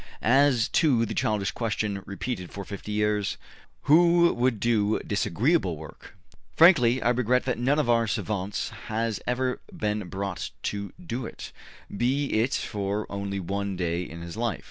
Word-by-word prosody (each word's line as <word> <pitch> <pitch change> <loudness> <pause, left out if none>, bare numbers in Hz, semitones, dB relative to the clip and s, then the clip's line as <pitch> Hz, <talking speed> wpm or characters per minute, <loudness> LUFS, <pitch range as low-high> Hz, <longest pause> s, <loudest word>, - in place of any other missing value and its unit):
As 130 -1 +4
to 130 -8 +3
the - - -4
childish 105 -3 0
question, 105 -3 -2
repeated 100 -2 -4
for 100 -1 -7
fifty 100 +2 -7
years: 105 -1 0 0.5
`Who 170 +3 +5
would 120 -2 +1
do 110 -2 +2
disagreeable 100 - +1
work?' 75 +1 -12 0.4
frankly 130 -8 +6
I 120 - +3
regret 125 +1 +2
that 125 -2 -1
none 135 +4 +2
of 150 - +1
our 115 -1 +3
savants 100 -2 -2 0.2
has 110 0 -1
ever 125 +1 -1
been 105 -3 -2
brought 95 -1 -4
to 100 -1 -3
do 125 -8 -4
it, - - -9 0.4
be 135 +6 0
it 115 +5 +2
for 100 0 -2
only 100 0 -3
one 100 +2 -3
day 85 -1 -1
in 85 -1 -8
his 85 +1 -7
life. 115 -1 -1
110 Hz, 155 wpm, -26 LUFS, 100-125 Hz, 0.5 s, frankly